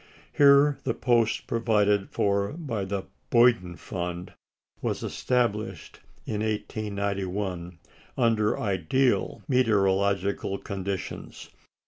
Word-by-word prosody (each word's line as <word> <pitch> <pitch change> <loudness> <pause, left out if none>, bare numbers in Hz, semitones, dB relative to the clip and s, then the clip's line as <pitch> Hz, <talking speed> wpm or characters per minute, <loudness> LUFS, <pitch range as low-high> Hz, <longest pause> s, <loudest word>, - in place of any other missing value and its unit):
Here 140 0 +5
the - - -1
post 120 -3 +1
provided 105 -4 +1
for 100 +1 0
by 135 - -4
the 95 0 -3 0.3
"Boyden 115 -7 +4
Fund" 90 0 -5 0.5
was - - -2
established 120 -4 -2 0.3
in 105 -1 -3
1891, 100 -4 -3 0.4
under 115 -4 +2
ideal 100 +4 0
meteorological 100 -5 +1
conditions. 100 -2 -6
105 Hz, 85 wpm, -27 LUFS, 95-115 Hz, 0.5 s, Here